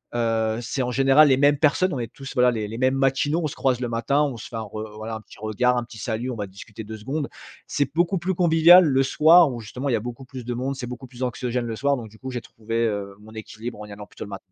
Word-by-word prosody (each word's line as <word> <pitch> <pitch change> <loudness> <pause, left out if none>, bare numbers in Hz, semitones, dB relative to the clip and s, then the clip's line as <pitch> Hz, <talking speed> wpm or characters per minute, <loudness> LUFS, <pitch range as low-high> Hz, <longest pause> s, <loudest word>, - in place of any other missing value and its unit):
heu, 115 -1 0
c'est 130 +3 -3
en 125 - -2
général 135 +4 +5
les 130 - +4
mêmes 145 0 +4
personnes, 165 +4 +2
on 130 - -3
est 115 -1 -5
tous 135 +1 -9
voilà 125 -1 +5
les 110 -3 -3
les 115 +2 -7
mêmes 130 +1 +2
matinaux, 135 +4 +1
on - - +1
se 145 - -7
croise 130 -2 +1
le 120 - -2
matin, 140 +5 +1
on 135 -5 -2
se - - -8
fait 120 - -9
un 110 - -3
re 110 0 -7
voilà, 110 +1 -6
un 110 - -7
petit - - -17
regard, 120 +4 +1
un 120 - 0
petit 115 -2 -12
salut, 115 +4 -3
on - - -5
va 105 - -4
discuter 100 +3 -10
2 110 +1 -8
secondes. 140 +7 -4 0.4
C'est 145 -2 0
beaucoup 175 +2 +3
plus 185 +3 -1
convivial 170 +1 +7
le 135 -3 +3
soir 160 +3 +6
où, 120 - -6
justement, 125 +6 -5
il - - +1
y - - +4
a - - 0
beaucoup 120 +3 -7
plus 125 -2 -9
de 120 - -3
monde, 130 +3 -3
c'est 125 -3 -5
beaucoup 125 +1 -8
plus 125 +1 -7
anxiogène 125 0 -2
le 115 - -4
soir 140 +4 +1
donc 115 -3 -7
du 110 - -18
coup 130 0 -6
j'ai 125 - -3
trouvé, 115 +1 -3
heu, 100 -2 -4
mon 110 +1 -14
équilibre 110 +1 -8
en - - -7
y 105 - -12
allant 105 0 -9
plutôt - - -9
le - - -11
matin. 100 - -5
125 Hz, 300 wpm, -24 LUFS, 110-135 Hz, 0.4 s, convivial